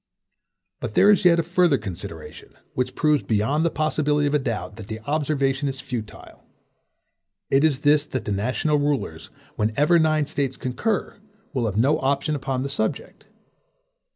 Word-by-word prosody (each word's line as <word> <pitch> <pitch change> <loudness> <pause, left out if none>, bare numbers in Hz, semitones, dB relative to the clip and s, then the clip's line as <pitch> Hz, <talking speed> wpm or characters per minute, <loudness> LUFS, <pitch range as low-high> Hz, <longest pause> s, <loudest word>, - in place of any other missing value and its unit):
But 115 -3 -5
there 205 - +6
is 200 - +2
yet 170 -1 +6
a - - +2
further 175 -3 +3
consideration, 85 -6 -8 0.2
which 125 0 -2
proves 150 -2 +2
beyond 115 +9 0
the 170 - +2
possibility 150 -1 0
of 145 - 0
a 150 - +3
doubt, 115 -4 -4
that 110 -3 -9
the 110 0 -5
observation 140 0 0
is 135 -1 -6
futile. 115 -5 -7 1.1
It 135 +2 +4
is 145 -4 +2
this 145 0 +3
that 130 -6 -4
the - - -2
national 125 +9 0
rulers, 140 - -2 0.3
whenever 145 +11 +3
nine 155 -2 +2
States 135 -2 -2
concur, 195 - -2 0.3
will 125 -4 0
have 105 -1 -3
no 140 +7 +3
option 140 +2 0
upon 130 -2 -2
the 140 - -3
subject. 110 -6 -4
140 Hz, 160 wpm, -23 LUFS, 120-150 Hz, 1.1 s, there